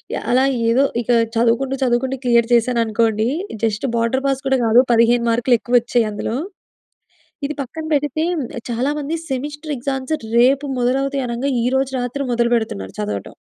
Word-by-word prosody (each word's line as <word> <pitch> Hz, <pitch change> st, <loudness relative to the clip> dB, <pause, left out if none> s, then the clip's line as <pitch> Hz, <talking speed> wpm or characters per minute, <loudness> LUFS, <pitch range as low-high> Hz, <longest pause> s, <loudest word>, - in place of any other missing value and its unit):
Yeah! -, -, -5 dB
అలా 260 Hz, +1 st, +4 dB, 0.3 s
ఏదో, 270 Hz, +4 st, +4 dB, 0.2 s
ఇక 245 Hz, -, -1 dB, 0.3 s
చదువుకుంటూ, 240 Hz, +3 st, +1 dB
చదువుకుంటూ 255 Hz, +2 st, 0 dB
క్లియర్ 235 Hz, -1 st, +3 dB
చేశాననుకోండి. 230 Hz, -1 st, +1 dB, 0.4 s
జస్ట్ 220 Hz, +5 st, -1 dB
బోర్డర్ 230 Hz, +4 st, 0 dB
పాస్ 270 Hz, -1 st, 0 dB
కూడా 265 Hz, -1 st, +2 dB
కాదు. 235 Hz, +3 st, +6 dB
15 235 Hz, +1 st, +3 dB
మార్కులు 240 Hz, +1 st, +3 dB
ఎక్కువ 245 Hz, -, -1 dB
వచ్చాయి 240 Hz, -1 st, +1 dB
అందులో. 220 Hz, +3 st, -3 dB, 1.1 s
ఇది 300 Hz, -, -2 dB
పక్కన 315 Hz, +5 st, -6 dB
పెడితే, 295 Hz, +2 st, 0 dB, 0.5 s
చాలా 240 Hz, +4 st, 0 dB
మంది 295 Hz, +3 st, -3 dB
సెమిస్టర్ 295 Hz, +3 st, -4 dB
ఎక్సా‌మ్స్ 265 Hz, +3 st, -3 dB, 0.2 s
రేపు 270 Hz, +4 st, +4 dB
మొదలవుతాయి 270 Hz, +2 st, 0 dB
అనంగా, 245 Hz, +4 st, -2 dB
ఈరోజు 265 Hz, +2 st, 0 dB
రాత్రి 245 Hz, +3 st, -3 dB
మొదలు 235 Hz, 0 st, +1 dB
పెడుతున్నారు, 100 Hz, -, -3 dB
చదవటం. 105 Hz, -1 st, -4 dB
245 Hz, 145 wpm, -19 LUFS, 230-270 Hz, 1.1 s, కాదు